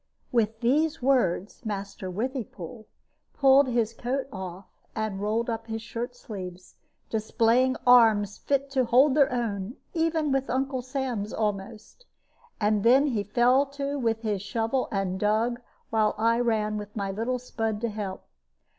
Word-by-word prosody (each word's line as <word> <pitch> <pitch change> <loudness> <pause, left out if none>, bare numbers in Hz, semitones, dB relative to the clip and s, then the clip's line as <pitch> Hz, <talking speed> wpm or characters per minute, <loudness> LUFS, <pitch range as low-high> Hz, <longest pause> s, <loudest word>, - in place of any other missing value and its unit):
With 225 -1 +1
these 305 +6 +2
words 240 -6 +1
Master 200 -3 -5
Withypool 220 - -5 0.5
pulled 275 0 +5
his 235 -2 0
coat 255 +4 -2
off 190 -1 -7 0.3
and 215 -3 -2
rolled 220 +3 0
up 225 -1 -3
his 225 0 -4
shirt 235 +2 -5
sleeves, 185 -6 -8 0.4
displaying 230 +4 +2
arms 220 -5 +5
fit 275 0 -1
to 260 -2 +2
hold 260 +4 +5
their 280 -1 +4
own 225 -2 -2 0.2
even 325 -3 +1
with 270 0 0
Uncle 265 0 -1
Sam's 250 -5 -3
almost; 215 - -4 0.5
and 210 -1 +2
then 260 +5 +6
he 240 -8 0
fell 245 +6 +3
to 280 +1 -3
with 225 -2 0
his 210 -3 -1
shovel 225 +5 -1
and 195 -2 -1
dug, 225 +4 +1 0.3
while 215 -1 +2
I 230 +2 +2
ran 215 -3 0
with 210 0 -9
my 200 -2 -2
little 230 +6 -1
spud 225 -3 -3
to 235 - 0
help. 205 -3 -5
230 Hz, 145 wpm, -27 LUFS, 210-260 Hz, 0.5 s, then